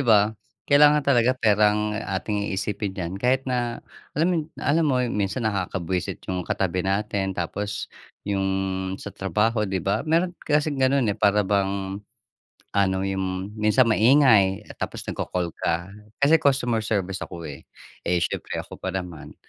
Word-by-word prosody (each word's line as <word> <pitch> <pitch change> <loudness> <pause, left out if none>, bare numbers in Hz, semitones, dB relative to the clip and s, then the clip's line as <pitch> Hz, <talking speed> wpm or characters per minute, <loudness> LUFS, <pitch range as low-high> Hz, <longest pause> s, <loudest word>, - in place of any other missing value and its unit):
ba? 110 -3 +4 0.3
Kailangan 150 0 +5
talaga 125 -2 +3
pera 105 -3 +3
ang 105 0 -1
ating 105 -1 -2
iisipin 100 0 -3
diyan 90 -1 -4
kahit 130 +3 +2
na 120 -2 -2 0.3
alam 165 +4 +2
yu 170 - +1 0.2
alam 160 +3 +1
mo, 130 - +2 0.2
minsan 105 +4 -1
nakakabwisit 95 -3 -2
yung 90 -1 -2
katabi 90 0 -1
natin 95 0 -1
tapos 100 +4 -4 0.3
yung 95 -1 0 0.5
sa - - -8
trabaho, 105 +3 0
di 95 - -1
ba? 100 - +1
Meron 170 +3 +2
kasing 145 -1 0
ganun, 130 0 +3
eh, - - -7
para 105 0 +3
bang 95 0 -1 0.8
ano, 95 -1 +3
yung 95 +1 -3
minsan 110 +4 +4
maingay 110 -4 +4
tapos - - -4
nagko-call 90 -1 -2
ka. 85 +2 -2 0.3
Kasi 150 +4 +6
customer 125 -6 +2
service 95 -4 -2
ako, 85 -2 -8
eh. 70 - -10 0.4
Eh, 90 +1 +2
siyempre - - -3
ako - - -11
pa - - -2
naman 90 -4 -6
105 Hz, 150 wpm, -24 LUFS, 95-125 Hz, 0.8 s, Kasi